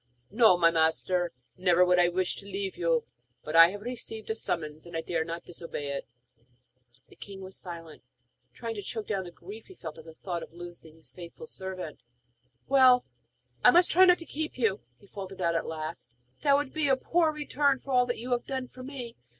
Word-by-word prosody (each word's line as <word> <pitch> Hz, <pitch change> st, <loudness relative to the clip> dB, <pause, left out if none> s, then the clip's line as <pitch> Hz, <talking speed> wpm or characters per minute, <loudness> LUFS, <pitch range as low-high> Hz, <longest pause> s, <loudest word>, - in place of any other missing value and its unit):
'No, 220 Hz, -4 st, +6 dB
my 165 Hz, -1 st, +5 dB
master; 170 Hz, +2 st, +1 dB, 0.3 s
never 180 Hz, -1 st, +4 dB
could 180 Hz, 0 st, +4 dB
I 175 Hz, -, +6 dB
wish 180 Hz, +1 st, 0 dB
to 200 Hz, -, -9 dB
leave 195 Hz, -1 st, -3 dB
you! 165 Hz, -2 st, +1 dB, 0.4 s
But 155 Hz, -, -4 dB
I 165 Hz, 0 st, +10 dB
have 205 Hz, +2 st, -7 dB
received 225 Hz, -2 st, -5 dB
a -, -, -1 dB
summons, 155 Hz, -6 st, -4 dB
and 170 Hz, -1 st, -5 dB
I -, -, -1 dB
dare 165 Hz, 0 st, -1 dB
not 170 Hz, +1 st, -6 dB
disobey 165 Hz, -4 st, -6 dB
it.' 140 Hz, -, -4 dB, 1.0 s
The -, -, -17 dB
king 195 Hz, -1 st, -9 dB
was 190 Hz, 0 st, -9 dB
silent, 165 Hz, -3 st, -9 dB, 0.5 s
trying 230 Hz, -1 st, -5 dB
to 205 Hz, -, -5 dB
choke 215 Hz, +2 st, -4 dB
down 195 Hz, -3 st, -2 dB
the 175 Hz, -, -8 dB
grief 200 Hz, +6 st, -11 dB
he 380 Hz, -, -13 dB
felt 160 Hz, -, -8 dB
at 160 Hz, -, -13 dB
the 160 Hz, -1 st, -12 dB
thought 175 Hz, -1 st, -4 dB
of -, -, -10 dB
losing 175 Hz, -2 st, -11 dB
his 160 Hz, -, -15 dB
faithful 175 Hz, -, -10 dB
servant. 190 Hz, -, -6 dB, 0.7 s
'Well, 255 Hz, -2 st, +6 dB, 0.6 s
I -, -, +9 dB
must 350 Hz, -1 st, +5 dB
not 375 Hz, +1 st, +8 dB
try 360 Hz, -, +8 dB
to 335 Hz, -, -10 dB
keep 315 Hz, -2 st, -4 dB
you,' 220 Hz, -5 st, +1 dB, 0.2 s
he -, -, -20 dB
faltered 195 Hz, -1 st, -8 dB
out 170 Hz, -, +1 dB
at 165 Hz, -, -1 dB
last. 155 Hz, -6 st, -6 dB, 0.3 s
'That 280 Hz, -1 st, +5 dB
would 290 Hz, -2 st, -2 dB
be 310 Hz, -2 st, +1 dB
a 265 Hz, -1 st, +4 dB
poor 330 Hz, +4 st, +2 dB
return 290 Hz, -2 st, +1 dB
for 275 Hz, -, -8 dB
all 250 Hz, -1 st, +4 dB
that 245 Hz, -, -2 dB
you 245 Hz, +2 st, -6 dB
have 245 Hz, -1 st, 0 dB
done 260 Hz, -2 st, -3 dB
for 255 Hz, -, -12 dB
me! 255 Hz, -3 st, -7 dB
190 Hz, 215 wpm, -29 LUFS, 170-250 Hz, 1.0 s, I